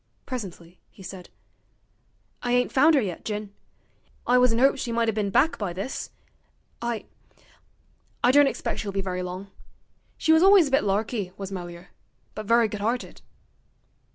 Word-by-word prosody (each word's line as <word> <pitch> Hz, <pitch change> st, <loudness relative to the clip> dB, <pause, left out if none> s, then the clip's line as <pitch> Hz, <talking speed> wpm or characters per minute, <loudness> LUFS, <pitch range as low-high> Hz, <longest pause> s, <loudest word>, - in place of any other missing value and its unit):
Presently 180 Hz, -8 st, -7 dB
he 195 Hz, -, -15 dB
said: 180 Hz, 0 st, -9 dB, 1.1 s
'I 245 Hz, 0 st, -1 dB
ain't 245 Hz, 0 st, +2 dB
found 305 Hz, +4 st, +5 dB
'er 275 Hz, -, +4 dB
yet, 185 Hz, -6 st, -5 dB
Jin; 210 Hz, -1 st, -5 dB, 0.7 s
I 250 Hz, +1 st, +4 dB
was 250 Hz, -1 st, +4 dB
in 225 Hz, -, 0 dB
'opes 270 Hz, +1 st, +3 dB
she 235 Hz, -, -3 dB
might 230 Hz, 0 st, +1 dB
'a' 225 Hz, -, +1 dB
bin 210 Hz, -1 st, -1 dB
back 295 Hz, +11 st, +2 dB
by 195 Hz, -5 st, -3 dB
this. 195 Hz, +9 st, -5 dB, 0.7 s
I 235 Hz, -2 st, -3 dB, 1.2 s
I 245 Hz, -, +6 dB
don't 285 Hz, +1 st, +6 dB
expect -, -, -3 dB
she'll 205 Hz, -, -3 dB
be 195 Hz, 0 st, -2 dB
very 185 Hz, -1 st, -3 dB
long. 185 Hz, +2 st, -6 dB, 0.7 s
She 320 Hz, -, +3 dB
was 320 Hz, -, +5 dB
alwis 380 Hz, -5 st, +6 dB
a -, -, -11 dB
bit 270 Hz, -, +3 dB
larky, 205 Hz, -1 st, -1 dB
was 195 Hz, -1 st, -6 dB
Melier; 175 Hz, -1 st, -8 dB, 0.4 s
but 215 Hz, -1 st, -7 dB
very 230 Hz, 0 st, +4 dB
good 210 Hz, -1 st, -6 dB
'arted.' 235 Hz, +4 st, -3 dB
215 Hz, 170 wpm, -25 LUFS, 195-250 Hz, 1.2 s, I